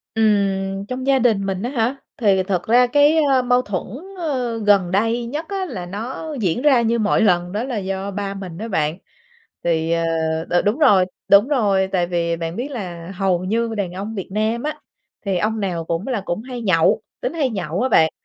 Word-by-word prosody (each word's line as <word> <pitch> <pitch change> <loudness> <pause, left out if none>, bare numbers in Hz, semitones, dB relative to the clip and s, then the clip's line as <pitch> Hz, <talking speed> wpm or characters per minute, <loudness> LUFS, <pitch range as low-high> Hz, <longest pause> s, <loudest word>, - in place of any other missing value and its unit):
Ừm, 195 -3 +1
trong 255 +1 -4
gia 275 -1 +4
đình 220 -6 +2
mình 190 0 -2
á 245 - -2
hả? 250 0 0 0.2
Thì 195 -5 +3
thật 185 -2 -2
ra 245 +2 +5
cái, 290 +5 +4
a, 260 -1 +4
mâu 245 0 +2
thuẫn, 195 -6 -3 0.3
ơ, 255 -9 -2
gần 205 -4 +3
đây 225 +5 +1
nhất 300 +6 -4
á 390 -1 -2
là 185 -9 -6
nó 240 - -5
diễn 195 +5 0
ra 275 -5 +5
như 235 0 +1
mọi 215 0 +2
lần, 180 -4 +2
đó 215 +4 -2
là 250 -5 -3
do 195 +1 -3
ba 200 0 -4
mình 185 -4 -7
á 225 +3 -5
bạn. 155 -4 -1 0.7
Thì 165 -1 +1
ờ, 165 0 +1 0.5
đ - - -4
đúng 215 +7 +1
rồi, 205 -12 +5 0.2
đúng 200 +5 +6
rồi, 200 -9 +2
tại 180 -2 +1
vì 170 -1 -1
bạn 165 +1 -4
biết 255 +5 -4
là 180 -8 -6
hầu 185 -1 0
như 225 +3 -1
đàn 190 -4 -2
ông 200 +4 -5
Việt 195 -4 -5
Nam 220 +3 0
á, 305 +1 -3 0.5
thì 190 -2 +1
ông 220 +3 -1
nào 175 -4 -2
cũng 165 +4 -3
là 230 -7 -1
cũng 175 +4 -3
hay 250 -1 -7
nhậu, 170 -6 +3 0.2
tính - - -3
hay 290 -6 0
nhậu 185 -3 -3
á 260 - +1
bạn, 160 -9 +4
205 Hz, 215 wpm, -20 LUFS, 185-245 Hz, 0.7 s, đúng